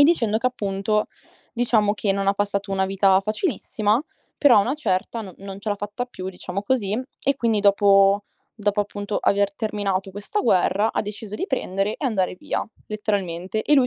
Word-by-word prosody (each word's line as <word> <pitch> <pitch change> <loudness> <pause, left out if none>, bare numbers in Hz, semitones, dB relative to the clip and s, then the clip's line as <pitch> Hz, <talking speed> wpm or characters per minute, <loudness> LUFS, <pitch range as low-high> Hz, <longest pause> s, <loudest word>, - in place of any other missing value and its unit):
E - - +10
dicendo 235 -10 +3
che, 250 - 0
appunto, 210 -3 0 0.5
diciamo, 225 -4 +2
che 205 -1 +1
non 195 0 -1
ha 200 - +3
passato 200 0 -1
una 190 0 +1
vita 195 0 +4
facilissima, 215 - 0 0.4
però 285 -4 +6
a - - +7
una 245 +7 0
certa 225 -4 -1
no 190 -3 -10
non 195 0 -8
ce 210 +1 -3
l'ha 205 - 0
fatta 205 +4 -4
più, 190 -7 -7
diciamo 190 +1 -5
così, 210 -1 0 0.2
e 275 0 +2
quindi 225 -4 +1
dopo 200 0 +5 0.4
dopo, 205 0 +1
appunto, 205 0 -3
aver 200 0 +2
terminato 200 -3 -2
questa 205 - -3
guerra, 200 - +2
ha - - 0
deciso 210 0 -6
di 375 - -3
prendere 200 - -1
e - - -6
andare 200 -9 0
via, 180 - -3 0.2
letteralmente. 205 -2 -2
E 295 - +3
lui 265 -3 +5
205 Hz, 185 wpm, -23 LUFS, 195-220 Hz, 0.5 s, E